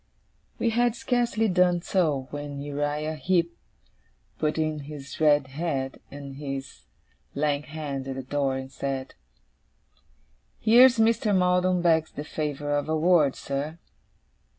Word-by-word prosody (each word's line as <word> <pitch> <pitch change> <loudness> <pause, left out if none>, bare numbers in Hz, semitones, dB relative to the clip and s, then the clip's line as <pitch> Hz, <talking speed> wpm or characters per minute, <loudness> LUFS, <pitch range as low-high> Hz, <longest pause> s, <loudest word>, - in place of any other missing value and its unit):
We 230 - +1
had 240 0 +2
scarcely 240 -3 +1
done 180 -2 +2
so, 150 -8 0
when 145 -1 -5
Uriah 145 +2 -2
Heep 170 +1 +1 0.8
put 155 0 0
in 155 -1 -1
his 140 -3 -8
red 145 -2 +5
head 135 -3 -3
and 140 -1 -9
his 135 -1 -6 0.5
lank 145 0 0
hand 140 -3 -5
at 135 - -4
the 135 - -5
door, 135 0 -1
and 130 0 -7
said: 135 -1 -4 1.5
'Here's 240 +3 +6
Mr. 220 -2 +3
Maldon 180 0 +2
begs 160 -2 +3
the 145 - -5
favour 145 -1 -2
of 145 +1 -2
a 160 - +1
word, 155 -4 +4
sir. 145 +4 -4
150 Hz, 130 wpm, -26 LUFS, 140-180 Hz, 1.5 s, Here's